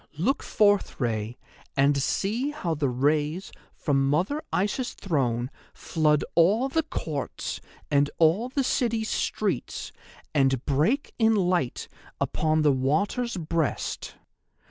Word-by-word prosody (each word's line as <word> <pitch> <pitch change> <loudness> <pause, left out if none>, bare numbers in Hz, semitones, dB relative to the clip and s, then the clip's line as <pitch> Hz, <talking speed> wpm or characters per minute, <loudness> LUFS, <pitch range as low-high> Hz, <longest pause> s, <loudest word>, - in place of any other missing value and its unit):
Look 250 - +1
forth, 205 -2 +2
Rei, 115 -2 -2 0.4
and 140 +1 +3
see 225 - 0
how 240 - -2
the 145 -3 0
rays 150 +7 0 0.2
from 135 -2 +1
Mother 185 - +1
Isis' 210 +6 -1
throne 130 - -1 0.2
flood 150 -2 +1
all 205 +10 +4
the 320 +4 +2
courts 160 - -4 0.3
and 145 0 +3
all 170 +10 +3
the 270 +1 0
city's 230 -3 0
streets 195 - -2 0.4
and 135 -3 +2
break 160 - +1
in 225 -1 +4
light 180 - 0 0.3
upon 155 0 +1
the 150 - +5
water's 195 - 0
breast. 165 -2 -2
160 Hz, 120 wpm, -26 LUFS, 140-215 Hz, 0.4 s, the